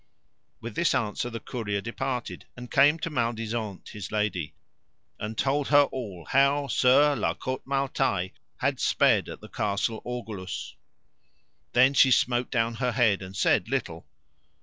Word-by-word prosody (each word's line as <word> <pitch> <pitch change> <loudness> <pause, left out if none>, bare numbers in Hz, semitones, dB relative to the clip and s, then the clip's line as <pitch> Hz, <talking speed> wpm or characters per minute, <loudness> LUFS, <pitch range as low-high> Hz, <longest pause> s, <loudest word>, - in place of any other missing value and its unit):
With 115 - -6
this 170 +1 +1
answer 120 0 -1
the 115 -1 -6
courier 105 -5 -3
departed 125 +3 -4
and 125 -1 -9
came 145 +3 +5
to 165 0 -4
Maledisant 115 -5 -3
his 105 -2 -8
lady, 105 -7 -2 0.6
and 110 +1 -5
told 140 +1 0
her 145 -1 +6
all 105 -11 -6
how 140 +1 +3
Sir 140 +3 +4
La - - -1
Cote 130 0 -5
Male 140 0 0
Taile 100 -10 0 0.3
had - - -1
sped - - +3
at - - -9
the - - -10
Castle 105 +2 -2
Orgulous. 110 -6 -6 1.0
Then 130 +3 +5
she 135 -1 +6
smote 125 -1 +2
down 115 -2 0
her 125 0 0
head, 110 -5 +2
and 95 0 -9
said - - +2
little. - - -3
120 Hz, 150 wpm, -27 LUFS, 105-135 Hz, 1.0 s, her